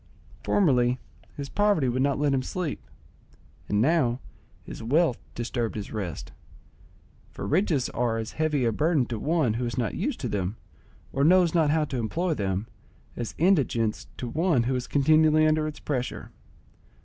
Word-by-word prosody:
Formerly 125 -10 +3 0.4
his 140 -1 -4
poverty 205 -6 +2
would 125 +1 0
not 140 0 +2
let 145 -1 +1
him 130 - +1
sleep, 160 +3 -4 0.9
and 105 - +1
now 130 -2 +2 0.4
his - - -9
wealth 135 +3 +2 0.2
disturbed 120 -1 -2
his 105 -2 -5
rest; 95 -8 -5 1.0
for - - -7
riches 155 -5 +1
are 120 -2 -1
as 110 -1 -4
heavy 150 -4 0
a 115 - +2
burden 150 +3 +2
to 115 -2 -5
one 150 -4 +1
who 120 +2 -2
is 120 - -5
not 115 -5 -1
used - - -2
to - - -2
them, 100 +1 -2 0.6
or 135 - +1
knows 175 +1 +5
not 160 -4 +3
how 155 0 +2
to 135 - -4
employ 165 +10 -1
them, 100 -4 -2 0.5
as 120 -2 -5
indigence 140 - +1
to 125 - -4
one 155 -1 +1
who 130 +3 0
is 125 -1 -3
continually 155 +2 +4
under 155 0 +2
its 155 - -7
pressure. 125 -4 -4
135 Hz, 165 wpm, -26 LUFS, 120-155 Hz, 1.0 s, knows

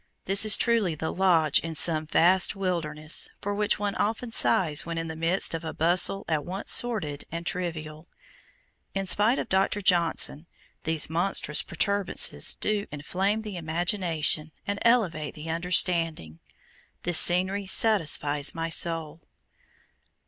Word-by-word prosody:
This 195 +2 +4
is 215 - +7
truly 225 -8 0
the 160 +1 -5
"lodge 170 -6 +2
in 165 -1 -7
some 155 0 +3
vast 180 +5 +3
wilderness" 165 -5 -2
for 205 - -4
which 205 0 0
one 205 0 -3
often 225 +3 -3
sighs 160 -8 +2
when 170 0 -6
in 165 0 -4
the 160 - -7
midst 165 +4 +1
of 165 0 -5
"a 160 - -7
bustle 175 +4 +1
at 155 -3 -2
once 190 +3 -3
sordid 170 -13 -1
and 170 +1 -6
trivial." 160 -3 -6 0.9
In 195 0 -2
spite 210 +6 +1
of - - -4
Dr. 195 +2 0
Johnson, 170 -4 +1 0.4
these 160 -1 +1
"monstrous 165 -2 +1
protuberances" 200 -2 0
do 210 -1 -2
"inflame 190 +9 -3
the 210 -4 -7
imagination 165 -2 0 0.2
and 200 0 -4
elevate 175 - 0
the 160 +1 -7
understanding." 165 - 0 0.6
This 175 -2 +4
scenery 185 +3 +2
satisfies 155 -9 +1
my 165 0 -4
soul. 165 -1 -1
170 Hz, 140 wpm, -25 LUFS, 160-195 Hz, 0.9 s, is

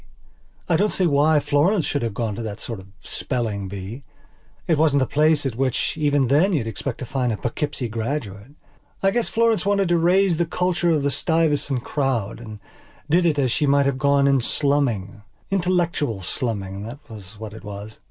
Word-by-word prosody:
I 170 - +3
don't 210 +4 +2
see 185 - +1
why 150 0 +4
Florence 155 +6 +2
should 145 - -1
have 115 -4 -3
gone 115 -2 -2
to 115 - -5
that 110 -2 -5
sort 115 -4 -6
of 95 - -13
spelling 110 -4 -3
bee. 100 +7 -7 0.6
It 160 -3 +2
wasn't 150 -3 +4
the - - +3
place 150 +1 +2
at 130 -4 -2
which, 130 0 0
even 145 -3 +2
then, 155 +10 +3
you 145 -8 +1
expected 115 +4 -5
to - - -18
find 125 -3 0
a 110 - -2
Poughkeepsie 125 +2 -3
graduate. 115 0 -4 0.5
I 195 - +4
guess 240 +2 0
Florence 225 -4 +2
wanted 200 -2 +1
to 175 -1 +3
raise 180 +1 +3
the 170 0 0
culture 175 0 0
of 155 -4 +2
the 140 - +1
Stuyvesant 145 -3 +1
crowd 125 -7 -1
and 110 -3 -9 0.5
did 175 +1 +4
it 155 -3 +1
as 130 -4 +1
she 150 - +1
might 140 0 +4
have 135 -1 0
gone 140 0 +3
in 135 -2 +3
slumming. 120 -7 0 0.3
Intellectual 170 - 0
slumming, 100 -2 -3
that 115 +6 -7
was 105 -3 -11
what 110 -2 -7
it 110 - -11
was. 105 +1 -8
140 Hz, 190 wpm, -22 LUFS, 115-160 Hz, 0.6 s, why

